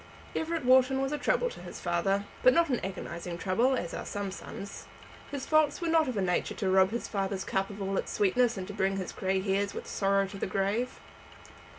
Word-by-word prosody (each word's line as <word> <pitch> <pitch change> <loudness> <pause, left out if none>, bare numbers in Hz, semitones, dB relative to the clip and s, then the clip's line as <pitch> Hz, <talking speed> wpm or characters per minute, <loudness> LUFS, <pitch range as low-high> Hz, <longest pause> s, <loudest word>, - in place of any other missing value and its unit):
Everett 325 -3 -1
Wharton 260 +1 +5
was 270 +1 0
a 295 - -2
trouble - - +1
to - - -10
his - - -8
father, 195 +3 0 0.2
but 255 - +6
not 335 -2 +4
an 250 - +1
agonizing 175 -2 -5
trouble, 230 +9 +2
as 175 - -4
are - - -4
some 205 -1 -4
sons. 195 +1 -8 0.4
His 280 -2 -4
faults 310 -2 +3
were 340 -2 -1
not 325 -2 +4
of 250 -4 -2
a 195 - +1
nature 180 -1 0
to 190 -4 0
rob 190 0 +5
his 235 +3 -3
father's 195 -1 -2
cup 195 0 0
of 205 0 -8
all 195 0 -1
its - - -4
sweetness 225 +3 +2
and 185 - -4
to 205 - -6
bring 195 0 0
his 185 -2 -4
grey 190 0 0
hairs 200 +1 0
with - - -5
sorrow 195 0 +1
to 195 0 -8
the - - -1
grave. 200 +6 -1
200 Hz, 225 wpm, -30 LUFS, 190-255 Hz, 0.4 s, but